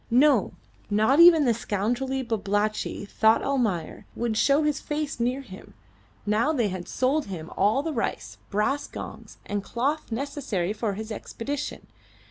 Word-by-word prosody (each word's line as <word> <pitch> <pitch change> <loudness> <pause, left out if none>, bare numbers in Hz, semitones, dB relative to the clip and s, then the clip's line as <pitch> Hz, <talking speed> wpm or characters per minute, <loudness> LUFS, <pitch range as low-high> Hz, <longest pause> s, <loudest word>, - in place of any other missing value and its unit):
No, 275 +5 +4 0.4
not 220 +8 +3
even 335 -3 +8
the 240 - +4
scoundrelly 240 +5 -1
Babalatchi, 210 -2 -1
thought 220 +2 +3
Almayer, 225 -12 -1
would 235 -2 -1
show 280 +6 +3
his 300 -1 +1
face 295 -3 -3
near 250 +3 0
him, 195 -8 -12 0.5
now 215 +8 +2
they 240 -9 +1
had 185 -2 -6
sold 275 +4 +1
him 165 -5 -7
all 215 +8 +2
the 320 0 -2
rice, 235 - -3
brass 245 +8 0
gongs, - - -9
and 205 -1 -3
cloth 270 +7 -2
necessary 230 - -2
for 215 -1 -2
his 220 +3 -6
expedition. 265 +6 -5
235 Hz, 145 wpm, -26 LUFS, 210-280 Hz, 0.5 s, even